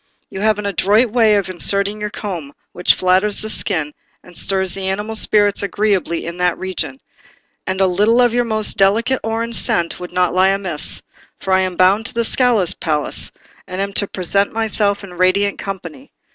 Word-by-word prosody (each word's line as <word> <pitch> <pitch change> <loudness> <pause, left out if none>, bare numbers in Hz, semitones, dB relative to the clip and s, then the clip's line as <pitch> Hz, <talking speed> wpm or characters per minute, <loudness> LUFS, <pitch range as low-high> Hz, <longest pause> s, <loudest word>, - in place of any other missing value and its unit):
You 190 - -6
have 215 0 +2
an 210 - -5
adroit 205 +4 +2
way 225 -3 +4
of 200 -2 0
inserting 200 +3 0
your 210 - -2
comb, 175 -9 -6 0.2
which 180 - +2
flatters 185 +3 +2
the 215 - -1
skin, 160 -9 0 0.3
and 180 - -16
stirs 190 -1 -1
the 195 -1 -3
animal 210 +3 -3
spirits 205 -2 +2
agreeably 200 -4 -1
in 170 +1 -6
that 180 -1 0
region; 190 +8 -4 0.7
and 190 0 -2
a 190 - +4
little 210 +6 +2
of 245 -2 +3
your 245 0 +2
most 220 -2 +1
delicate 225 +6 +2
orange 230 +1 -3
scent 170 -1 0
would 180 0 -8
not 180 -1 +1
lie 185 +1 +4
amiss, 185 -6 -2 0.4
for 190 - -2
I 190 - +4
am 185 -1 -1
bound 195 +5 +3
to - - -11
the 235 0 0
Scala 240 -5 +2
palace, 150 -3 -1 0.4
and 185 +1 -6
am 200 0 -3
to 200 - +1
present 195 +2 0
myself 210 -2 0
in 190 -2 -10
radiant 185 +3 +1
company. 230 - -8
200 Hz, 185 wpm, -18 LUFS, 185-215 Hz, 0.7 s, way